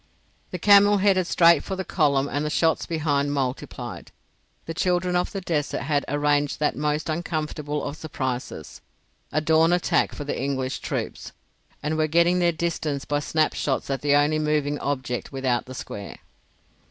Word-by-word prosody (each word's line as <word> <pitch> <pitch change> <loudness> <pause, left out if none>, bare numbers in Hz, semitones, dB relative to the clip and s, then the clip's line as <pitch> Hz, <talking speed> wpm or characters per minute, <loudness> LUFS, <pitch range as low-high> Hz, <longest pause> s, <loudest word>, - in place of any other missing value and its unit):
The 180 - -4
camel 205 +2 +6
headed 190 -2 +2
straight 170 -4 +5
for 190 - -4
the 190 0 -4
column 140 -4 +2
and 145 +1 -2
the 150 - -1
shots 160 +1 +1
behind 145 -3 0
multiplied. 130 -2 -4 0.5
The 165 - -4
children 180 +1 0
of 180 - 0
the 195 - -4
desert 150 -5 -2
had 145 -2 0
arranged 145 0 +1
that 150 - +1
most 150 +1 -1
uncomfortable 155 -2 -3
of 145 - -4
surprises, 130 - -5 0.5
a 155 - +1
dawn 160 +2 +4
attack 175 0 +1
for 145 - -5
the 145 - -3
English 135 -1 -2
troops, - - -5 0.5
and 155 +1 -1
were 155 - +2
getting 170 +3 +3
their 175 -1 +3
distance 155 -4 -2
by 145 0 0
snap 155 +1 +1
shots 140 0 -2
at 135 -2 -2
the 145 0 +3
only 150 +2 +3
moving 150 -1 0
object 130 -3 -3
without 130 -3 -1
the 130 - -8
square. 100 -4 -7
150 Hz, 165 wpm, -24 LUFS, 140-170 Hz, 0.5 s, camel